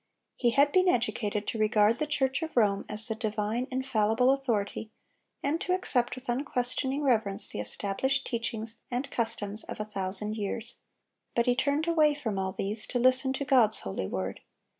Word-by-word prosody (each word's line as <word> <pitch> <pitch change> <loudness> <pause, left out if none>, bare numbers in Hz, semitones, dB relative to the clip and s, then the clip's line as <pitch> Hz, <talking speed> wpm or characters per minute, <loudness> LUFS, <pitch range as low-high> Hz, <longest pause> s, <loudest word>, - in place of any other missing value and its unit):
He 240 - +2
had 280 +4 +4
been 370 +2 +4
educated 215 -5 0
to 225 - -3
regard 215 +1 +3
the 305 - 0
Church 270 -1 0
of 320 -5 -5
Rome 200 -4 +3
as 215 +1 -2
the 225 - 0
divine, 220 +2 -2
infallible 250 -2 +2
authority, 225 -5 -1 0.5
and 300 +4 0
to 365 - +1
accept 250 -10 0
with 255 +1 -10
unquestioning 260 +2 -1
reverence 220 -7 +2
the - - -4
established 205 - -1
teachings 230 -2 -3
and 250 +3 -3
customs 220 -2 -2
of - - -7
a 210 - -2
thousand 210 +1 -2
years; 210 +2 -4 0.6
but 235 - +3
he 245 - +4
turned 285 +5 0
away 310 -3 +4
from 220 -9 -3
all 190 0 -1
these 205 +3 -3
to - - -1
listen 255 +2 +3
to 280 +1 -3
God's 240 -6 +4
holy 95 -1 -3
word. 95 0 -3
235 Hz, 175 wpm, -29 LUFS, 210-265 Hz, 0.6 s, had